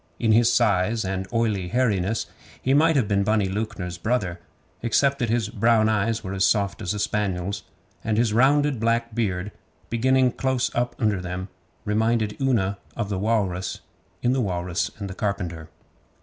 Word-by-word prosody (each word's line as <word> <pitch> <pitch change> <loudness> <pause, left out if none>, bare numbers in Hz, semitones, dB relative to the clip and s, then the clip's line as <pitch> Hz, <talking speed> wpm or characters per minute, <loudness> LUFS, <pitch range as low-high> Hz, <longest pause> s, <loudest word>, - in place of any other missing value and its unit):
In 110 - +2
his 115 +1 +5
size 110 -1 +2
and 95 0 -3
oily 110 -6 0
hairiness 110 -2 0 0.3
he 130 - +1
might 160 +3 +4
have 130 -7 +2
been 100 -1 +2
Bunny 105 0 +2
Lewknor's 95 -3 -4
brother, 95 -6 -1 0.4
except 140 +4 +2
that 120 -3 0
his 115 -2 0
brown 115 -1 +3
eyes 110 +1 0
were 95 -1 -4
as 95 -1 0
soft 100 0 +1
as 95 0 -2
a - - -3
spaniel's, 100 -2 -1 0.4
and 110 -1 0
his 115 -2 +2
rounded 140 +2 +3
black 115 +1 0
beard, 105 -3 -1 0.4
beginning 130 +2 +3
close 130 0 -1
up 120 +1 -1
under 105 -5 +1
them, 90 +1 -5 0.4
reminded 110 0 +1
Una 100 -7 +1 0.2
of 105 -4 -3
the 100 -2 -2
walrus 95 -4 -1 0.4
in 125 +1 +3
'The 130 - +1
Walrus 90 -4 -1
and 100 -3 -5
the 95 - -6
Carpenter. 85 -6 -3
110 Hz, 165 wpm, -24 LUFS, 95-120 Hz, 0.4 s, his